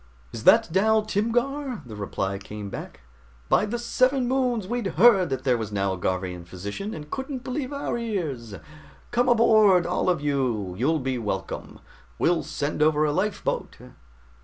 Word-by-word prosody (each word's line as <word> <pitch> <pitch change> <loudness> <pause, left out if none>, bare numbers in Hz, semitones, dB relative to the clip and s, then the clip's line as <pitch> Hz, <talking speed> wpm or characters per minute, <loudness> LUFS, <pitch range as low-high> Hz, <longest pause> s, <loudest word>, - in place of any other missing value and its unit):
"Is - - -8
that - - +7
Dal 215 +4 +3
Timgar?" 240 +5 -1
the 110 -3 -9
reply 100 -1 -3
came 105 0 -8
back. - - -8 0.5
"By 210 - +3
the 235 +3 -2
Seven 255 +2 +1
Moons! 250 -6 0
We'd 240 -1 -2
heard 200 -7 +6
that 135 -1 -3
there 125 -3 +2
was 110 -1 -4
now 100 -1 0
a - - -5
Garvian 90 -1 -2
physician, 100 - -6
and 150 -1 -9
couldn't 265 -1 -4
believe 255 +2 -3
our 280 -4 -3
ears. 155 - -3 0.6
Come 245 +1 +2
aboard, 215 -6 +5
all 180 +1 0
of 175 -2 +2
you, 130 -10 -1
you'll 145 - +1
be 130 -1 -2
welcome. 105 -4 -5 0.4
We'll 170 -1 +2
send 150 0 -3
over 155 0 +4
a 150 - +1
lifeboat!" 195 +5 -2
175 Hz, 160 wpm, -25 LUFS, -, 0.6 s, that